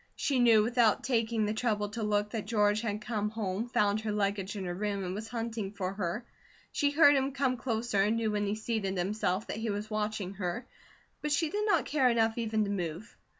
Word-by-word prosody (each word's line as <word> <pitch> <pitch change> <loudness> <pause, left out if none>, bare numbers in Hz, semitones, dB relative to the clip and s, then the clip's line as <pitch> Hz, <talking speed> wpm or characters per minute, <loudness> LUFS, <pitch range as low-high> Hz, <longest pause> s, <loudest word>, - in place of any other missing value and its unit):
She 275 -3 0
knew 230 -3 +6
without 235 -1 +3
taking 230 -3 +1
the 210 - 0
trouble 215 -3 0
to 225 +2 -5
look 210 -1 0
that 220 -3 -4
George 210 -1 +2
had 210 -2 -2
come 210 -2 -2
home, 215 +1 -3
found 210 -1 +2
her 220 -1 -2
luggage 200 -1 -1
in 195 -2 -4
her 175 - -2
room, 200 +1 -2
and 180 0 -3
was 215 +3 -5
hunting 225 -4 -4
for 190 -2 -3
her. 195 +4 -3 0.5
She 285 - +2
heard 290 -1 +6
him 270 0 +1
come 265 -2 +1
closer 230 -4 0
and 210 +3 +2
knew 225 -2 0
when 205 -1 0
he 205 - 0
seated 215 -3 -2
himself 190 +1 0
that - - -5
he 225 0 -2
was 210 +1 -3
watching 210 -2 -2
her, 180 +7 -2 0.6
but 300 - -2
she 305 +1 +1
did 420 +1 -1
not 415 - +3
care 270 -4 +3
enough 225 -1 +2
even 220 -1 +1
to 200 - -2
move. 180 0 -4
215 Hz, 220 wpm, -30 LUFS, 205-235 Hz, 0.6 s, knew